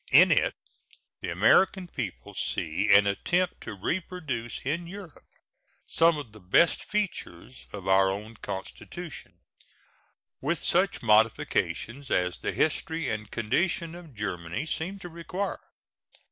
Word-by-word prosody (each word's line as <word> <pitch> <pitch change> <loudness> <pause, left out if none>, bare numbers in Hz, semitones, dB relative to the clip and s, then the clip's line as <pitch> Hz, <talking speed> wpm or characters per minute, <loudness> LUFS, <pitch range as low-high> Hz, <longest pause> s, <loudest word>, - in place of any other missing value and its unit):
In - - +8
it - - +3 0.6
the - - -4
American 190 -1 +4
people 120 - -6
see 90 +6 0
an 100 0 +8
attempt 175 - 0
to 110 - -6
reproduce 135 - -3
in 165 +5 -1
Europe 185 -4 -10 0.6
some 165 -1 +4
of 140 -7 -7
the 110 - -13
best 105 - +3
features 175 - -4
of 100 -2 -7
our 95 0 +5
own 105 +4 -5
Constitution, 160 - -7 1.0
with - - -1
such - - +2
modifications 110 +4 +2
as 90 -1 +1
the - - -2
history 160 +1 0
and 105 -2 -3
condition 160 - 0
of 170 -6 -11
Germany 90 - -3
seem 175 +5 -3
to 190 - -8
require. 175 +4 -4
130 Hz, 125 wpm, -28 LUFS, 100-170 Hz, 1.0 s, In